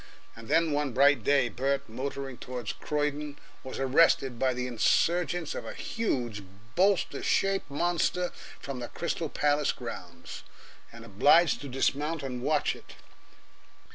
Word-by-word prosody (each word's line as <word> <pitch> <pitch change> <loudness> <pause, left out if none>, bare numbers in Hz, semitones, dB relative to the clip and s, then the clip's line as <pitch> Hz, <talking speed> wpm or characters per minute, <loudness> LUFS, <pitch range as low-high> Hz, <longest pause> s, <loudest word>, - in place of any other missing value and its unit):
And 115 0 -11
then 165 +3 +3
one 145 -3 0
bright 140 +3 +4
day 140 -3 +3
Bert, 135 +3 -1
motoring 135 +2 -5
toward 125 -4 -5
Croydon, 150 0 -2 0.3
was 130 - -7
arrested 135 -2 +3
by 130 -1 +2
the 125 0 -3
insurgence 170 +7 +1
of - - -5
a - - -7
huge, 120 - -2 0.3
bolster 190 +2 +2
shaped 195 -4 +1
monster 175 +3 0 0.3
from 135 -2 -6
the 120 - -5
Crystal 170 +1 -3
Palace 145 0 +1
grounds, 85 -8 -8 0.5
and 115 0 -11
obliged 145 - +4
to 145 - -6
dismount 145 +4 -1
and 125 -2 -4
watch 150 +4 +1
it. - - -14
140 Hz, 140 wpm, -29 LUFS, 125-155 Hz, 0.5 s, bright